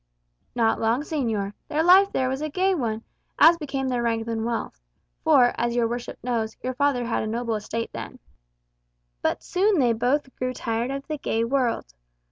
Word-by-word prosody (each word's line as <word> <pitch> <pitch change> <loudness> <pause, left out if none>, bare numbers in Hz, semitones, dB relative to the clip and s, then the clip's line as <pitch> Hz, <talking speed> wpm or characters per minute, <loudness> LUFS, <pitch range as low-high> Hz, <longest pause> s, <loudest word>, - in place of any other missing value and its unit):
"Not 225 -2 +2
long, 230 +4 +2
señor. 225 -10 -2
Their 310 +2 0
life 380 +3 +6
there 260 - 0
was 265 +2 -2
a 310 - -2
gay 380 +5 +1
one, 230 -8 -2 0.3
as 335 +2 +7
became 275 -3 -3
their 250 -2 0
rank 230 -1 0
and 225 -1 -2
wealth 230 - -3 0.4
(for, 245 - +5
as 235 0 0
your 235 -1 +2
worship 240 +1 -5
knows, 230 -3 -2
your 255 +1 -2
father 265 -2 +1
had 230 - -1
a 215 - -3
noble 230 +1 -2
estate 220 +2 -3
then). - - -7 1.0
But - - -1
soon 390 +2 +2
they 245 -5 +3
both 260 +4 0
grew 255 0 -2
tired 230 +2 -2
of 275 0 -4
the 305 -2 -4
gay 225 -4 0
world. 240 - -1
245 Hz, 185 wpm, -25 LUFS, 230-280 Hz, 1.0 s, as